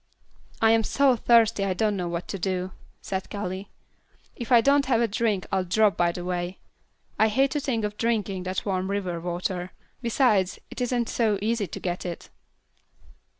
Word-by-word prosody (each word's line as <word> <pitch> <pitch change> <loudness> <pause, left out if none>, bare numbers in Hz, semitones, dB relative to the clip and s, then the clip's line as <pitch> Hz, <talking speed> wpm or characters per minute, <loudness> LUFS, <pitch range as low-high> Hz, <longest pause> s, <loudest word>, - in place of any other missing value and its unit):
"I 225 - +6
am 225 0 +4
so 270 +3 +3
thirsty 230 -3 +4
I 190 -2 0
don't 210 +1 +1
know 180 -2 -2
what 170 0 -4
to 195 - -4
do," 185 0 -2 0.3
said 190 -1 -4
Callie. 190 -1 -5 0.7
"If 240 +1 -7
I 240 - +8
don't 280 +3 +3
have 245 -4 +3
a 235 - +2
drink 210 -2 0
I'll 190 -1 +1
drop 200 +1 +3
by 175 0 +2
the 175 0 -6
way. 180 0 -3 0.6
I 220 - +6
hate 265 +5 +2
to 295 - 0
think 245 -6 -1
of 210 0 -5
drinking 210 -5 -1
that 185 0 -3
warm 190 -1 -1
river 185 -4 -2
water; 180 +1 -3 0.3
besides, 220 -6 +2
it - - -6
isn't 245 -1 0
so 215 -3 +1
easy 215 0 0
to - - -7
get 175 -1 -3
it." 175 -2 -7
205 Hz, 185 wpm, -26 LUFS, 185-230 Hz, 0.7 s, I